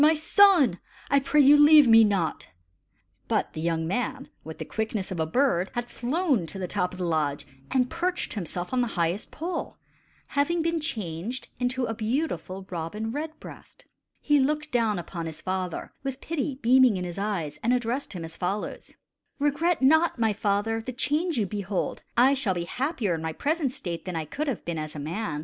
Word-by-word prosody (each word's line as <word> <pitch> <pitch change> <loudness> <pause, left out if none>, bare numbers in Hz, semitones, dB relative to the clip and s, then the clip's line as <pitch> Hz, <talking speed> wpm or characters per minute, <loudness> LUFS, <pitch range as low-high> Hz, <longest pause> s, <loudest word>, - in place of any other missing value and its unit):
my 310 +2 +6
son! 315 - +5 0.3
I 280 - +5
pray 295 +2 +3
you 285 +1 +8
leave 295 -1 +8
me 225 -1 +8
not!" 195 -6 0 0.8
But - - 0
the 155 - -5
young 165 -1 0
man, 250 +8 -2
with 160 0 -8
the - - -5
quickness 220 -3 -3
of 180 - -4
a 160 - 0
bird, 195 - +1
had 240 0 -3
flown 260 - 0
to 160 - -8
the 185 -1 -3
top 180 +1 -1
of 185 - -10
the 180 - -2
lodge 150 -4 -1 0.2
and 255 -1 +2
perched 350 +4 -2
himself 180 0 -4
on 255 - +2
the 240 - +1
highest 170 +4 0
pole, 340 +2 -5 0.5
having 320 +4 0
been 335 0 0
changed 215 - -4
into 250 0 0
a 225 - -2
beautiful 220 - -2
robin 185 +6 -4
red 310 +4 -5
breast. - - -13 0.3
He 295 -1 +3
looked 300 +3 0
down 225 -5 +1
upon 170 -1 -5
his 160 -1 -7
father 185 -2 -4
with 270 -1 -4
pity 300 -3 -3
beaming 250 -3 +5
in 180 - -3
his 175 +1 -5
eyes, 170 -8 -3
and 235 - +1
addressed 250 +1 -1
him 170 -3 -5
as 165 0 -10
follows: 195 +3 -3 0.5
"Regret 295 +2 +1
not, 320 +4 +4
my 225 -2 +2
father, 210 +2 0
the 255 +3 -6
change 305 +5 0
you 215 - +2
behold. 200 -1 -3 0.2
I 260 +3 +6
shall 230 -9 +1
be 175 - -2
happier 250 - -1
in 160 - -3
my 160 0 -3
present 295 - 0
state 175 -8 -5
than 180 -2 -4
I 160 -1 -2
could 300 - -4
have 260 -7 -3
been 170 -2 -3
as 155 0 -6
a - - -5
man. 160 +2 -3
225 Hz, 195 wpm, -26 LUFS, 180-280 Hz, 0.8 s, you